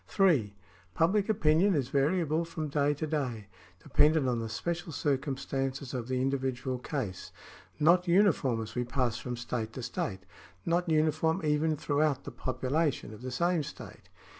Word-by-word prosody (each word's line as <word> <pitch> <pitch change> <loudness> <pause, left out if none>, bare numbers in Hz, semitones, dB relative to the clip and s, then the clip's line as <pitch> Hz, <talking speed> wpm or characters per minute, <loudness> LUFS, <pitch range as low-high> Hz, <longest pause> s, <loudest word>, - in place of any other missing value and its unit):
(3) 150 - +2 0.4
Public 195 +6 +2
opinion 180 0 +3
is 135 -4 0
variable 155 +3 +1
from 160 -2 -5
day 145 0 +2
to 155 - -3
day 130 -9 -2 0.2
— 95 -1 -26
dependent 150 0 +3
on 120 -2 0
the 115 -1 -4
special 170 +9 -3
circumstances 135 -2 -2
of 120 -3 -3
the 130 0 -1
individual 130 -1 -1
case 125 -8 -4 0.2
— - - -24
not 175 +4 +4
uniform 170 - +3
as 110 0 -9
we 125 - -1
pass 120 -2 -1
from 125 -1 -5
state 115 -2 -4
to 130 - -6
state 105 -5 -3 0.3
— 90 - -31
not 175 +1 +1
uniform 160 +2 +2
even 150 +1 +1
throughout 145 -2 +1
the - - -7
population 130 -2 -1
of 105 - -11
the 130 - -5
same 170 +6 +1
state. 145 0 -10
145 Hz, 165 wpm, -30 LUFS, 125-160 Hz, 0.4 s, not